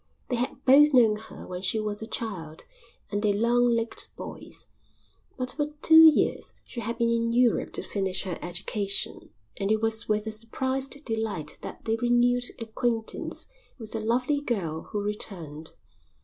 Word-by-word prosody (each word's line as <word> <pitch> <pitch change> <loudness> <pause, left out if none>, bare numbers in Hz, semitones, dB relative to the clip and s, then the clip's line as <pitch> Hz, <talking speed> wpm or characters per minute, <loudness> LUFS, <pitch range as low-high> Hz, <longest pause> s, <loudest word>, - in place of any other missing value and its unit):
They 250 - +1
had 250 +3 -3
both 280 +2 +7
known 225 -4 +6
her 215 +1 -10
when 180 0 -5
she 190 +4 +1
was 210 -1 -3
a 220 - -5
child 180 -10 -5 0.5
and 205 0 -1
they 210 -1 +3
long 240 +3 +3
legged 230 -1 -1
boys, - - -6 0.7
but 250 -1 -2
for 295 +2 -1 0.2
two 320 0 +10
years 310 - 0
she 240 - -7
had 230 +1 -3
been 235 -1 +2
in 230 0 +1
Europe 245 -1 +3
to - - -2
finish 190 -2 -1
her 185 -3 -4
education 195 +3 -3 0.3
and 195 +1 0
it 220 - +3
was 225 0 0
with 210 0 +1
a 220 - -3
surprised 265 +6 -2
delight 220 -10 -3
that - - -8
they 225 0 +1
renewed 245 +1 +3
acquaintance 230 0 -2 0.3
with 220 -3 -6
the 225 - -2
lovely 250 +6 +1
girl 175 - -3
who 205 -1 -2
returned. 165 -7 -4
225 Hz, 165 wpm, -27 LUFS, 205-245 Hz, 0.7 s, two